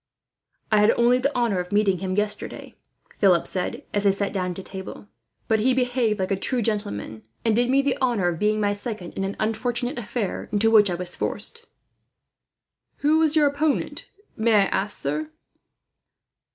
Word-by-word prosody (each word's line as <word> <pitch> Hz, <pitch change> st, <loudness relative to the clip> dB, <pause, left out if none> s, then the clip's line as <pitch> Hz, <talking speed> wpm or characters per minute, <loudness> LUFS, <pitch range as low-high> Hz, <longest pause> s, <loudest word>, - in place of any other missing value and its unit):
"I 215 Hz, -, +5 dB
had 210 Hz, +1 st, +5 dB
only 240 Hz, +1 st, +4 dB
the 280 Hz, +3 st, -1 dB
honour 235 Hz, -6 st, +1 dB
of 180 Hz, 0 st, -5 dB
meeting 205 Hz, -3 st, +2 dB
him 185 Hz, -1 st, -3 dB
yesterday," 210 Hz, 0 st, -2 dB, 0.4 s
Philip 185 Hz, -4 st, +4 dB
said, 180 Hz, -1 st, -3 dB
as 205 Hz, -, 0 dB
they 200 Hz, -, +5 dB
sat 200 Hz, +1 st, -2 dB
down 180 Hz, -2 st, -2 dB
to 190 Hz, -, -7 dB
table; 190 Hz, +1 st, -9 dB, 0.4 s
"but 220 Hz, -1 st, +2 dB
he 250 Hz, +4 st, +2 dB
behaved 245 Hz, -4 st, +1 dB
like 190 Hz, +1 st, -1 dB
a -, -, +3 dB
true 240 Hz, +5 st, -1 dB
gentleman, 110 Hz, -, -2 dB, 0.2 s
and 225 Hz, -2 st, +3 dB
did 245 Hz, +1 st, +2 dB
me 275 Hz, +1 st, +3 dB
the 275 Hz, -1 st, 0 dB
honour 235 Hz, -9 st, +2 dB
of 165 Hz, -2 st, -4 dB
being 215 Hz, +1 st, +1 dB
my 205 Hz, -1 st, +1 dB
second, 205 Hz, -4 st, -6 dB
in 195 Hz, -, -3 dB
an 195 Hz, +1 st, -3 dB
unfortunate 240 Hz, +4 st, -2 dB
affair 225 Hz, -3 st, -4 dB
into 220 Hz, +2 st, +3 dB
which 210 Hz, -3 st, +6 dB
I 175 Hz, -, -1 dB
was 180 Hz, 0 st, -2 dB
forced." 465 Hz, 0 st, -5 dB, 1.4 s
"Who 310 Hz, +2 st, +4 dB
was 315 Hz, -1 st, +2 dB
your 305 Hz, -1 st, +5 dB
opponent, 285 Hz, +1 st, -1 dB, 0.3 s
may 220 Hz, 0 st, +2 dB
I 205 Hz, -, +6 dB
ask, 195 Hz, +1 st, -1 dB
sir?" 150 Hz, +2 st, -2 dB
210 Hz, 180 wpm, -24 LUFS, 190-245 Hz, 1.4 s, which